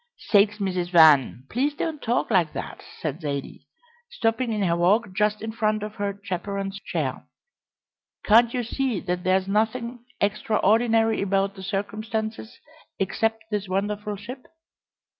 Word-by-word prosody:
"Sakes, 210 0 +3
Mrs. 185 -3 -2
Van, 155 -7 +6
please 280 - -1
don't 310 -1 -3
talk 240 0 0
like 175 -6 +2
that!" - - -6 0.2
said 155 +1 -4
Zaidie, 140 -2 -5 0.4
stopping 235 - 0
in 210 -2 0
her 170 -3 +2
walk 190 +4 +2
just 210 +2 0
in 220 - -3
front 215 -2 0
of 210 0 -5
her 200 -1 -3
chaperon's 195 +1 -4
chair. - - -3 1.0
"Can't 230 +2 +5
you 245 -1 -1
see 245 -2 -1
that 180 0 -3
there's 185 +1 +2
nothing 235 +4 -1 0.2
extraordinary 225 +2 +2
about 195 0 +1
the 195 - -11
circumstances 215 +3 -4 0.4
except 225 +3 0
this 200 -2 -2
wonderful 205 +2 -2
ship? 245 +6 -9
210 Hz, 140 wpm, -25 LUFS, 190-225 Hz, 1.0 s, Van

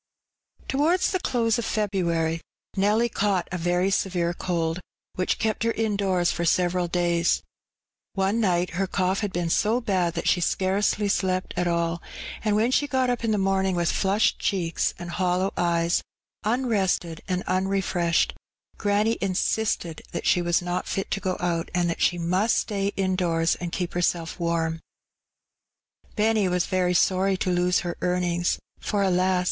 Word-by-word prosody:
T - - -2
■OWARDS 340 +5 +3
the 370 - 0
close 230 -8 +1
of 235 - -3
February 170 -6 0 0.3
Nelly 210 +4 +3
caught 200 -5 0
a 180 - -2
very 175 +3 +1
severe 175 -3 0
cold, 170 -1 -2 0.3
which 185 - 0
kept 220 -1 -1
her 230 0 +1
indoors 200 -5 +1
for 170 - -2
several 175 +1 +1
daya. 175 -1 +1 0.7
One 195 +4 +1
nighb 180 -3 +1
her 190 +3 -1
cough 185 +1 0
had 205 -3 -2
been 175 -2 -1
so 220 +7 +2
bad 185 -7 0
that 165 - -2
she 180 - +3
scarcely 195 +4 +1
slept 185 -2 0
at 175 0 0
all, 170 -1 0 0.4
and 210 -2 +2
when 225 +4 +2
she 290 +2 +2
got 260 -2 +1
up 245 -1 -3
in 230 - 0
the 215 - +2
morning, 190 -1 +1
with 175 -1 +1
flushed 200 +2 +1
cheeks 170 -4 0
and 175 -1 -7
hollow 185 +1 0
eye 170 -1 +1 0.6
a, 215 - 0
unrested 200 -9 0
and 185 -1 -1
unrefreahed, 185 -2 +1 0.5
granny 210 +2 +1
in 195 -2 -1
sisted 180 -6 -1
that - - -4
she 180 - +3
was 175 0 +1
not 175 0 -2
fit 195 - -3
to 195 - 0
go 185 -1 -2
out, 170 -2 -1
and 175 -1 +2
that - - -5
she 175 - +3
must 185 +6 +1
stay 200 -2 -1
indoors 180 -4 +1
and 175 -1 -5
keep 175 0 -3
her 175 - -1
self 170 -1 -1
warm. 165 -1 0 1.4
Benny 215 -2 +2
was 180 -1 +1
very 180 -1 +1
sorry 190 +2 +2
to 185 - -1
lose 180 0 +2
her 175 -2 -4
earnings, 175 -1 0 0.2
for, 205 -1 -1
alas 185 0 +2
185 Hz, 170 wpm, -25 LUFS, 175-205 Hz, 1.4 s, ■OWARDS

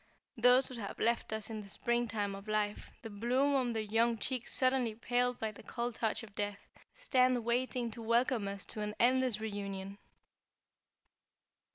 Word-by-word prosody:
Those 250 +2 +5
who - - -7
have 200 - -5
left 235 0 +1
us 220 -1 -3
in 215 -1 -4
the 200 - -11
spring 240 +3 0
time 205 -2 -2
of 195 +2 -9
life, 210 -1 -1
the 225 - -6
bloom 250 +7 +1
on 255 -3 +2
their 220 -1 -1
young 225 +2 +2
cheeks 255 +2 -2
suddenly 255 -4 +1
paled 245 +2 0
by 220 -1 -2
the 215 - -13
cold 240 0 -3
touch 225 0 -1
of 215 -2 -12
death, 205 0 -2 0.4
stand 255 - +2
waiting 245 0 0
to 230 - -8
welcome 230 -1 +2
us 200 0 -5
to 215 - -6
an 210 0 -3
endless 255 -2 +3
reunion." 200 -2 -5
230 Hz, 175 wpm, -34 LUFS, 210-250 Hz, 0.4 s, Those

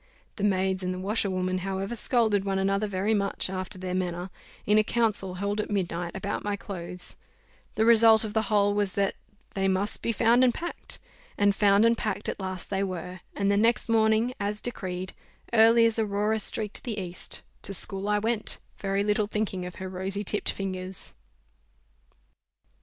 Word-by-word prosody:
The 200 - -4
maids 190 -1 +1
and 180 0 -2
the 185 - -4
washerwoman, 185 -2 -1
however, 195 +4 -3
scolded 220 -4 +2
one 195 -1 -1
another 195 +2 +1
very 200 +2 0
much 200 -2 0
after 185 -1 -4
their 185 0 -4
manner, 180 0 -2 0.3
in 210 +1 +4
a - - +4
council 210 -5 0
held 200 +3 -1
at - - -7
midnight, 175 -4 -2
about 200 +1 -3
my 205 0 -1
clothes; 180 -3 -5 0.6
the 220 - +2
result 225 -1 +7
of 215 -1 -5
the 220 - +2
whole 205 -1 +3
was 205 -2 0
that 200 -1 +1 0.4
"they 195 -1 0
must 190 +2 0
be 230 - 0
found 230 +3 +4
and 245 -2 +3
packed;" 345 +1 -4 0.4
and 205 0 +4
found 200 +1 +4
and 230 0 +4
packed 210 -1 -2
at - - -3
last 185 -1 -5
they 195 0 0
were; 185 -1 -4 0.2
and 200 0 +1
the 200 - +2
next 230 +2 +2
morning, 220 +2 +3
as 205 +1 -2
decreed, 185 -6 -4 0.4
early 230 +1 +6
as 230 0 +2
Aurora 210 +1 0
streaked 215 0 +1
the 230 -5 -4
east, 180 -2 -5 0.2
to - - -6
school 195 +1 +4
I 210 - +3
went, 220 +1 -1 0.2
very 195 0 0
little 210 0 +1
thinking 205 -4 -2
of 180 - -9
her 190 - -6
rosy 190 +2 -3
tipped 210 +1 -1
fingers. 185 -1 -5
200 Hz, 180 wpm, -27 LUFS, 190-215 Hz, 0.6 s, result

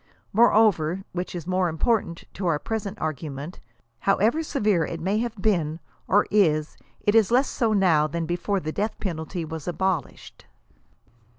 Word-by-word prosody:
Moreover, 195 -6 +4
— - - -43
which 180 0 -4
is 170 -3 -5
more 185 0 +1
important 170 0 0
to 185 -1 -3
our 165 -3 +2
present 210 +3 -4
argu 155 -3 -3
ment, 145 +6 -8 0.5
ho 195 - +4
wever 240 +11 +2
severe 210 - +1
it 165 +2 -4
may 195 +6 0
have 235 0 -2
been, 170 -7 0 0.3
or 205 +2 +4
is, 155 -7 +2 0.3
it 205 - +2
is 220 -3 +5
less 255 +4 +3
so 230 -3 0
now 175 -7 +3
than 165 +2 -3
before 175 +4 -1
the 155 -3 -4
death 210 +6 -3
penalty 170 -2 -4
was 160 0 -7
abolished. 175 -3 -3
185 Hz, 170 wpm, -25 LUFS, 160-210 Hz, 0.5 s, is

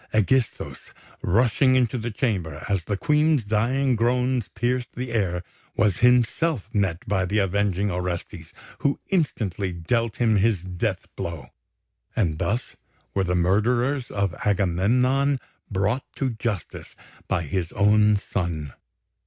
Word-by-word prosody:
Ægisthos, 115 +3 0 0.3
rushing 125 +6 +3
into 125 -1 +2
the 115 +2 -3
chamber 95 - -2
as 100 -4 0
the 100 - -1
Queen's 150 0 +3
dying 120 +6 +1
groans 125 0 +1
pierced 125 +1 -1
the 125 -1 -4
air, 95 -6 0 0.3
was 100 -3 +2
himself 125 - +3
met 100 -5 0
by 95 -2 +1
the 100 +4 -1
avenging 100 0 +1
Orestes, 85 -2 -4 0.3
who 140 - 0
instantly 105 - 0
dealt 110 +7 -1
him 110 -3 +2
his 100 -3 +2
death 95 +2 -2
blow; 80 -7 -5 0.7
and 85 -9 0
thus 115 +4 -2 0.4
were 95 - +1
the 90 0 0
murderers 120 +9 +1
of 100 -3 -1
Agamemnon 120 +9 +2 0.3
brought 105 +6 0
to 135 -2 -1
justice 110 -5 -5 0.3
by 90 -3 0
his 85 +2 -2
own 105 +1 +4
son. 85 -8 -3
105 Hz, 130 wpm, -24 LUFS, 95-125 Hz, 0.7 s, own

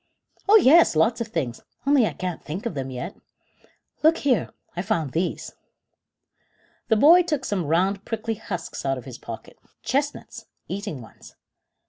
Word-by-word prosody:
"Oh 425 - +8
yes, 335 - +6
lots 225 +10 +2
of 230 - -2
things, 130 - -3 0.2
only 275 -5 +4
I - - -4
can't 180 -2 -5
think 170 +8 -6
of 235 - -2
them 135 -2 -4
yet. 130 +9 -6 0.9
Look 320 +2 +5
here, 250 - +1 0.3
I 175 - -1
found 180 - -1
these." 175 +4 -2 1.3
The 220 - +3
boy 320 +10 +7
took 300 -6 -2
some 185 -7 -1
round 190 +5 +1
prickly 225 0 -3
husks 200 -6 -6
out 135 -1 0
of 125 - -9
his 130 -3 -9
pocket. 115 -1 -9 0.2
"Chestnuts 285 +2 -2 0.2
eating 190 - -5
ones." 110 - -16
200 Hz, 155 wpm, -24 LUFS, 160-260 Hz, 1.3 s, Oh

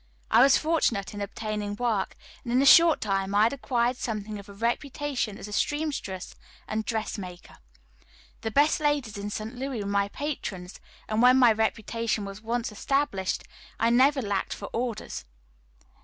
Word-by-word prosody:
I - - +7
was 270 +1 +7
fortunate 300 -12 0
in 205 - -6
obtaining 210 0 -4
work, 225 -3 -1 0.3
and 235 - -5
in 250 - +3
a 275 - +3
short 330 +2 +7
time 195 -1 -1
I 205 - +6
had 230 - +3
acquired 250 -2 0
something 215 -3 -4
of 200 +1 -12
a - - -10
reputation 240 +1 -2
as - - -8
a 210 - -8
seamstress 285 - -2 0.3
and 220 0 -2
dress 220 -1 -3
maker. 180 -2 -10 0.8
The 225 - -2
best 290 +7 +3
ladies 290 -7 0
in 205 +1 -4
St. 215 +3 -5
Louis 255 -3 -4
were - - -5
my 200 0 +1
patrons, 200 -8 -5 0.3
and 215 +1 0
when 250 +1 +7
my 245 -3 +7
reputation 220 0 -1
was 195 +1 -8
once 230 +1 -2
established 210 -4 -1 0.4
I 230 +1 +3
never 265 +2 +4
lacked 200 -2 -2
for 200 - -7
orders. 235 - -3
225 Hz, 170 wpm, -27 LUFS, 205-260 Hz, 0.8 s, I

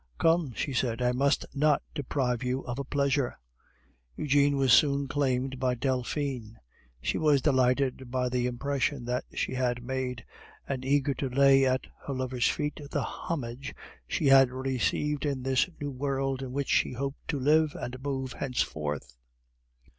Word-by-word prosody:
"Come," 165 -5 +2
she 140 - -2
said, 120 -2 0
"I 125 0 +2
must 140 +4 +1
not 150 0 +2
deprive 130 -4 -1
you 130 +1 -1
of 120 +1 -5
a - - -1
pleasure." 140 -1 0 0.8
Eugene 145 -1 +3
was 135 -3 +4
soon 140 +1 +4
claimed 130 -2 -1
by 125 -1 +1
Delphine. 125 -2 -2 0.4
She - - -1
was 150 -3 +4
delighted 130 -2 +2
by 125 0 0
the 125 0 0
impression 135 +1 -1
that 125 +1 -2
she - - -1
had 125 -1 -1
made, 130 -1 -3 0.4
and 130 -2 -3
eager 140 +1 +2
to 135 0 -3
lay 135 +1 +5
at 130 0 0 0.2
her 140 - -2
lover's 130 -1 0
feet 150 +1 -2
the - - -1
homage 135 -5 -5 0.3
she 155 - -1
had 135 -1 +7
received 135 +3 -1
in 140 -4 -2
this 130 +5 +2
new 145 -1 -3
world 135 0 -1
in 130 -2 -5
which 140 +1 -2
she - - +2
hoped 135 +2 -5
to 145 - -1
live 155 +3 +3
and 125 +1 -6
move 135 -2 -3
henceforth. 75 - -3
135 Hz, 160 wpm, -29 LUFS, 125-140 Hz, 0.8 s, had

